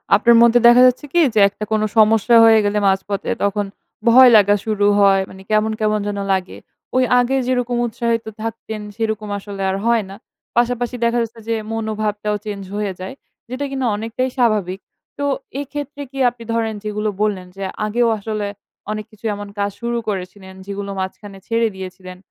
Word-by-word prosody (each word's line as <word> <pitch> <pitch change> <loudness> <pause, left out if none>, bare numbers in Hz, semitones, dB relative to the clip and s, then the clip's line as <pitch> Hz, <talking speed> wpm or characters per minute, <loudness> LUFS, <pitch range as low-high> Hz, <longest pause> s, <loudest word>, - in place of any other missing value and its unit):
আপনার 235 -1 +5
মধ্যে 235 +1 +5
দেখা 240 +1 +7
যাচ্ছে 255 +4 0
কি? 345 - +4
যে 220 - +3
একটা 205 - -8
কোনো 215 0 +2
সমস্যা 220 +2 +5
হয়ে 225 -1 +6
গেলে 205 +1 0
মাঝপথে 195 +1 -1
তখন 200 0 0 0.4
ভয় 255 +2 +8
লাগা 205 0 +4
শুরু 210 -2 0
হয়। 195 -1 +5
মানে 190 - -12
কেমন, 215 +1 +2
কেমন 215 -1 +1
যেন 205 -1 -3
লাগে। 185 -1 -3 0.4
ওই 255 - +4 0.2
আগে 245 +2 +1
যেরকম 245 -1 0
উৎসাহিত 230 0 -2 0.2
থাকতেন 220 -1 -5
সেরকম 220 -1 -3
আসলে 200 -1 -8
আর 190 - -1
হয় 235 -2 +3
না। 195 - -9 0.4
পাশাপাশি 245 0 +1
দেখা 235 +1 +1
যাচ্ছে 230 0 -9
যে 230 - +1 0.2
মনোভাবটাও 215 -1 -2
চেঞ্জ 205 -2 -5
হয়ে 205 -2 -2
যায়। 185 +5 -6 0.4
যেটা 255 +3 -3
কিনা 265 -1 -2
অনেকটাই 230 +4 -2
স্বাভাবিক। 210 -6 +1 0.4
তো 285 - -1 0.4
এক্ষেত্রে 290 0 -6
কি 275 - -7
আপনি 240 -1 -13
ধরেন 225 -1 0
যেগুলো 210 0 -2
বললেন 200 -4 -1
যে 195 - -5 0.2
আগেও 235 +3 +1
আসলে 210 0 -3 0.4
অনেক 215 0 -4
কিছু 215 +1 -15
এমন 205 0 -7
কাজ 200 0 +1
শুরু 235 0 -1
করেছিলেন 190 0 -6
যেগুলো 200 0 -5
মাঝখানে 195 +1 -6
ছেড়ে 230 0 +2
দিয়েছিলেন। 185 -1 -9
215 Hz, 170 wpm, -19 LUFS, 200-235 Hz, 0.4 s, ভয়